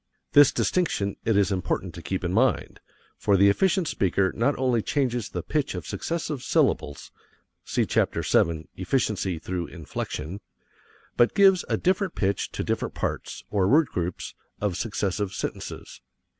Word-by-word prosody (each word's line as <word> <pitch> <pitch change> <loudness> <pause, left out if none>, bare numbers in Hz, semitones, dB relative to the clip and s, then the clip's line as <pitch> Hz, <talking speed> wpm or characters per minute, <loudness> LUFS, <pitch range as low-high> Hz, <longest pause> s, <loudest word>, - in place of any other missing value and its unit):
This 145 -1 +7
distinction 105 - 0
it 110 -2 +2
is 100 -1 +3
important 90 -1 -2
to 85 - -8
keep 95 +2 -3
in 90 0 -1
mind, 120 +2 +1 0.4
for 100 - +3
the 100 +1 +6
efficient 190 - +2
speaker 95 - +1
not 130 +5 +1
only 125 -3 +1
changes 120 -5 -1
the 90 - -4
pitch 150 -2 -1
of - - -5
successive 160 -5 -3
syllables 70 -10 0 0.5
(see - - 0
Chapter - - 0
VII, 80 -1 +1
"Efficiency 95 -3 0
through 85 +1 -4
Inflection"), 80 +3 -6 0.8
but 120 - +4
gives 195 -3 +5
a - - +1
different 185 0 0
pitch 100 -1 -1
to - - -2
different - - -2
parts, - - -4
or 100 -3 +2
word 150 +6 +4
groups, 90 0 -4 0.3
of 100 -4 -1
successive 100 -1 -2
sentences. - - -6
100 Hz, 150 wpm, -26 LUFS, 95-135 Hz, 0.8 s, This